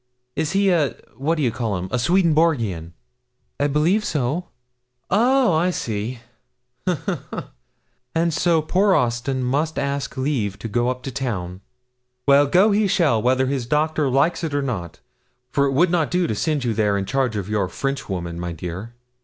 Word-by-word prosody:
'Is 160 Hz, +2 st, -1 dB
he 195 Hz, 0 st, +3 dB
a 155 Hz, -6 st, +1 dB, 0.2 s
what 155 Hz, +5 st, 0 dB
d'ye 140 Hz, -7 st, +1 dB
call'em 105 Hz, -7 st, -2 dB
a 125 Hz, -, 0 dB
Swedenborgian?' 150 Hz, -, +2 dB, 0.7 s
'I 145 Hz, -, +2 dB
believe 160 Hz, +9 st, +2 dB
so.' 150 Hz, +2 st, -1 dB, 0.6 s
'Oh, 245 Hz, +1 st, +4 dB
I 165 Hz, +3 st, +2 dB
see; 115 Hz, -, -3 dB, 0.7 s
ha, 180 Hz, -3 st, +2 dB
ha, -, -, -1 dB
ha! -, -, -6 dB, 0.7 s
And 165 Hz, 0 st, +2 dB
so 165 Hz, -1 st, +2 dB
poor 190 Hz, +4 st, +3 dB
Austin 125 Hz, +2 st, 0 dB
must 145 Hz, +5 st, 0 dB
ask 140 Hz, -1 st, -2 dB
leave 130 Hz, -8 st, -1 dB
to -, -, -6 dB
go 120 Hz, +3 st, 0 dB
up 125 Hz, 0 st, -4 dB
to 135 Hz, -, -4 dB
town. 100 Hz, -9 st, -4 dB, 0.7 s
Well, 140 Hz, +1 st, +6 dB
go 185 Hz, +8 st, +4 dB
he 205 Hz, 0 st, +3 dB
shall, 165 Hz, -, +2 dB
whether 130 Hz, +2 st, +2 dB
his 130 Hz, -3 st, -2 dB
doctor 150 Hz, 0 st, +1 dB
likes 140 Hz, +7 st, +2 dB
it 155 Hz, -3 st, -2 dB
or 145 Hz, -, +1 dB
not, 100 Hz, -11 st, -4 dB, 0.5 s
for 140 Hz, +1 st, +2 dB
it 135 Hz, -, -1 dB
would 170 Hz, +6 st, +3 dB
not 165 Hz, -4 st, +1 dB
do 180 Hz, 0 st, +1 dB
to 110 Hz, -, -1 dB
send 150 Hz, +5 st, -1 dB
you 120 Hz, -2 st, 0 dB
there 105 Hz, -2 st, +1 dB
in 100 Hz, -, -2 dB
charge 130 Hz, -1 st, 0 dB
of 100 Hz, -2 st, -3 dB
your 105 Hz, -3 st, 0 dB
Frenchwoman, 90 Hz, -9 st, -3 dB
my 85 Hz, -1 st, -4 dB
dear. 90 Hz, +8 st, -7 dB
135 Hz, 175 wpm, -22 LUFS, 115-165 Hz, 0.7 s, Well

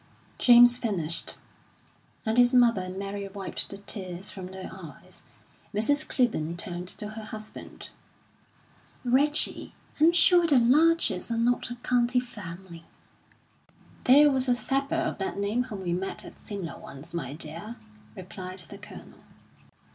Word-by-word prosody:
James 245 Hz, 0 st, +7 dB
finished, 170 Hz, -8 st, -1 dB, 0.9 s
and 220 Hz, 0 st, 0 dB
his 245 Hz, +1 st, +5 dB
mother 235 Hz, -5 st, +4 dB
and 185 Hz, +1 st, -7 dB
Mary 200 Hz, 0 st, -5 dB
wiped 195 Hz, -1 st, 0 dB
the 200 Hz, -, -7 dB
tears 190 Hz, -2 st, -5 dB
from 185 Hz, -2 st, -8 dB
their 190 Hz, 0 st, -8 dB
eyes. 165 Hz, -7 st, -12 dB, 0.5 s
Mrs. 285 Hz, +8 st, +2 dB
Clibborn 170 Hz, -, 0 dB
turned 175 Hz, -1 st, -6 dB
to 210 Hz, +3 st, -6 dB
her 215 Hz, 0 st, -8 dB
husband. 215 Hz, 0 st, -10 dB, 1.1 s
"Reggie, 290 Hz, +5 st, +3 dB, 0.2 s
I'm 320 Hz, +3 st, +6 dB
sure 345 Hz, 0 st, +5 dB
the 285 Hz, -4 st, +4 dB
Larchers 290 Hz, -, +3 dB
are 230 Hz, -, -1 dB
not 245 Hz, +2 st, 0 dB
a 240 Hz, -, -5 dB
county 245 Hz, 0 st, +1 dB
family." 190 Hz, -7 st, -9 dB, 1.2 s
"There 290 Hz, +3 st, +7 dB
was 260 Hz, -1 st, +1 dB
a 245 Hz, -, +4 dB
sapper 275 Hz, +4 st, -1 dB
of 330 Hz, -8 st, -2 dB
that 195 Hz, -, -3 dB
name 210 Hz, +5 st, -1 dB
whom 210 Hz, -6 st, -7 dB
we 175 Hz, -1 st, -1 dB
met 190 Hz, +2 st, -4 dB
at -, -, -11 dB
Simla 195 Hz, -6 st, -6 dB
once, 140 Hz, +4 st, -10 dB
my 140 Hz, -6 st, -4 dB
dear," 165 Hz, +8 st, -7 dB, 0.4 s
replied 185 Hz, 0 st, -8 dB
the 175 Hz, -6 st, -8 dB
Colonel. -, -, -13 dB
215 Hz, 140 wpm, -27 LUFS, 185-250 Hz, 1.2 s, James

